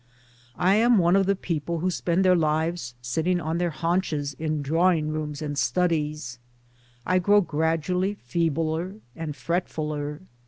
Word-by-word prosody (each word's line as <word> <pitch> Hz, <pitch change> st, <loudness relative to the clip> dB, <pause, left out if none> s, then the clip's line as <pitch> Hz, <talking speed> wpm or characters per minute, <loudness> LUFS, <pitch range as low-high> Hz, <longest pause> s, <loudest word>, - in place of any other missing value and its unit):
I 190 Hz, +3 st, +3 dB
am 235 Hz, +1 st, +5 dB
one 175 Hz, 0 st, +4 dB
of 195 Hz, -1 st, +3 dB
the 200 Hz, -, +3 dB
people 170 Hz, -2 st, -3 dB
who 180 Hz, +3 st, 0 dB
spend 180 Hz, +2 st, 0 dB
their 185 Hz, -1 st, +6 dB
lives 155 Hz, -5 st, 0 dB
sitting 165 Hz, +9 st, 0 dB
on 160 Hz, +1 st, -2 dB
their 175 Hz, -1 st, +1 dB
haunches 165 Hz, -4 st, -1 dB
in 155 Hz, -2 st, -1 dB
drawing 165 Hz, +1 st, +2 dB
rooms 155 Hz, -1 st, -4 dB
and 145 Hz, -1 st, -3 dB
studies; 150 Hz, -3 st, 0 dB, 0.7 s
I 185 Hz, 0 st, +3 dB
grow 205 Hz, +3 st, +4 dB
gradually 165 Hz, +4 st, 0 dB
feebler 165 Hz, +5 st, -1 dB, 0.2 s
and 160 Hz, -3 st, -5 dB
fretfuler. 150 Hz, -1 st, -3 dB
165 Hz, 145 wpm, -25 LUFS, 150-180 Hz, 0.7 s, their